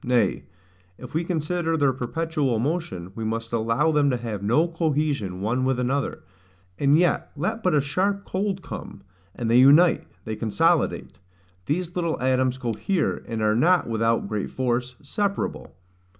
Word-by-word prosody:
Nay, 120 Hz, -5 st, +1 dB, 0.5 s
if 125 Hz, -, -10 dB
we 160 Hz, +2 st, 0 dB
consider 165 Hz, 0 st, -1 dB
their 140 Hz, -3 st, +3 dB
perpetual 140 Hz, 0 st, -1 dB
motion, 115 Hz, -, -3 dB
we 115 Hz, -, -5 dB
must 115 Hz, +1 st, -3 dB
allow 115 Hz, +8 st, +2 dB
them 145 Hz, -2 st, +3 dB
to 125 Hz, -, +1 dB
have 115 Hz, -4 st, -5 dB
no 120 Hz, +12 st, +2 dB
cohesion 150 Hz, -, -1 dB
one 120 Hz, +5 st, 0 dB
with 130 Hz, -1 st, +1 dB
another; 135 Hz, +3 st, -1 dB, 0.6 s
and 140 Hz, +1 st, +4 dB
yet 175 Hz, +1 st, +1 dB
let 190 Hz, +10 st, -2 dB
but 180 Hz, -6 st, +2 dB
a 145 Hz, -, +4 dB
sharp 195 Hz, +8 st, -1 dB
cold 190 Hz, 0 st, -2 dB
come, 100 Hz, -, -8 dB, 0.3 s
and 120 Hz, -, -3 dB
they 120 Hz, +2 st, +5 dB
unite, 150 Hz, +7 st, +6 dB, 0.2 s
they 110 Hz, -1 st, -3 dB
consolidate; 110 Hz, -1 st, 0 dB, 0.5 s
these 175 Hz, +3 st, -2 dB
little 170 Hz, -3 st, -1 dB
atoms 130 Hz, 0 st, +1 dB
cohere, 130 Hz, -, -1 dB
and 115 Hz, -2 st, -3 dB
are 105 Hz, 0 st, +3 dB
not, 175 Hz, +8 st, +3 dB
without 115 Hz, -1 st, +1 dB
great 105 Hz, -1 st, -3 dB
force, 125 Hz, 0 st, -1 dB
separable. 200 Hz, -, -3 dB
135 Hz, 155 wpm, -24 LUFS, 115-165 Hz, 0.6 s, unite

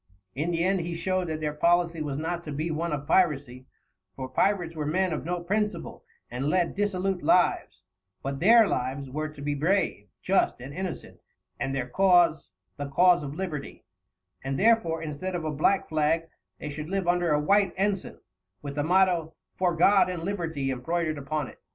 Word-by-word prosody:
In 150 Hz, +6 st, -2 dB
the 170 Hz, -1 st, 0 dB
end 190 Hz, +1 st, +2 dB
he 170 Hz, 0 st, -4 dB
showed 185 Hz, +1 st, -1 dB
that 155 Hz, -1 st, -4 dB
their 150 Hz, -1 st, -1 dB
policy 170 Hz, +1 st, +2 dB
was 145 Hz, -2 st, -3 dB
not 165 Hz, +3 st, -3 dB
to 150 Hz, -, -5 dB
be 155 Hz, +4 st, -2 dB
one 165 Hz, +2 st, -2 dB
of 145 Hz, -1 st, -3 dB
piracy, 145 Hz, -7 st, +1 dB, 0.5 s
for 130 Hz, -, -5 dB
pirates 175 Hz, +2 st, 0 dB
were 150 Hz, -2 st, -3 dB
men 185 Hz, +2 st, +1 dB
of 155 Hz, -, -3 dB
no 175 Hz, +1 st, -2 dB
principle 205 Hz, -1 st, -2 dB, 0.3 s
and 125 Hz, +3 st, -3 dB
led 175 Hz, +1 st, +1 dB
dissolute 195 Hz, -2 st, -1 dB
lives; 180 Hz, -, +2 dB, 0.4 s
but 135 Hz, 0 st, -3 dB
their 225 Hz, +4 st, +6 dB
lives 130 Hz, 0 st, -3 dB
were 155 Hz, +2 st, -3 dB
to 150 Hz, -1 st, -12 dB
be 145 Hz, 0 st, -1 dB
brave, 155 Hz, -, 0 dB
just, 190 Hz, -8 st, +1 dB
and 130 Hz, +3 st, -8 dB
innocent, 185 Hz, 0 st, -6 dB, 0.4 s
and 135 Hz, 0 st, -2 dB
their 130 Hz, -2 st, -2 dB
cause 175 Hz, +1 st, +3 dB, 0.3 s
the 145 Hz, 0 st, -5 dB
cause 175 Hz, +5 st, +4 dB
of 145 Hz, 0 st, -6 dB
Liberty; 160 Hz, -6 st, -6 dB, 0.6 s
and 135 Hz, 0 st, -2 dB
therefore, 205 Hz, -8 st, +3 dB
instead 160 Hz, +5 st, -4 dB
of 170 Hz, -2 st, -3 dB
a 155 Hz, -, -1 dB
black 160 Hz, +7 st, +1 dB
flag, 160 Hz, +1 st, +1 dB, 0.3 s
they 150 Hz, -, -6 dB
should 150 Hz, +2 st, -6 dB
live 195 Hz, -2 st, -1 dB
under 175 Hz, -1 st, +2 dB
a 150 Hz, -, +3 dB
white 200 Hz, +6 st, +3 dB
ensign, 195 Hz, 0 st, -2 dB, 0.4 s
with 140 Hz, -1 st, -5 dB
the 145 Hz, 0 st, -1 dB
motto 175 Hz, -1 st, +2 dB, 0.2 s
"For 180 Hz, -2 st, +1 dB
God 190 Hz, +3 st, +5 dB
and 175 Hz, -2 st, -4 dB
Liberty" 165 Hz, -8 st, -2 dB
embroidered 155 Hz, +4 st, -2 dB
upon 145 Hz, 0 st, -3 dB
it. -, -, -14 dB
165 Hz, 185 wpm, -27 LUFS, 145-185 Hz, 0.6 s, their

